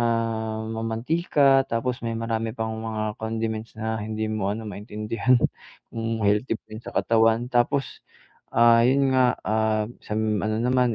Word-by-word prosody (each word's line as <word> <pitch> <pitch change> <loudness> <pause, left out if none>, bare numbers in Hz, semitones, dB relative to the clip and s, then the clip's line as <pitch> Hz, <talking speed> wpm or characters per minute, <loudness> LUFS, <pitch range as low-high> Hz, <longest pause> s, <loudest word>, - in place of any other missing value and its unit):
ah, 115 -1 -1
mamantika, 135 +5 +2
tapos 120 +2 -1
may 115 - -2
marami 115 0 -2
pang 110 0 -2
mga 110 -1 -3
condiments 110 0 -3
na 110 0 -2
hindi 110 +1 -3
mo 105 -2 -1
ano 115 - -6
maintindihan, 105 +4 -1 0.6
kung 115 -1 -3
healthy 105 +4 +2
ba - - -57
'yon 110 +2 -8
sa - - -6
katawan. 115 +1 +3
Tapos, 125 +3 0 0.5
ah, 115 0 +6
'yon 135 +1 +3
nga, 125 -1 +4
ah, 110 0 +1 0.2
sa 105 - -4
ano 110 0 0
naman 125 -1 +2
115 Hz, 150 wpm, -25 LUFS, 110-120 Hz, 0.6 s, ah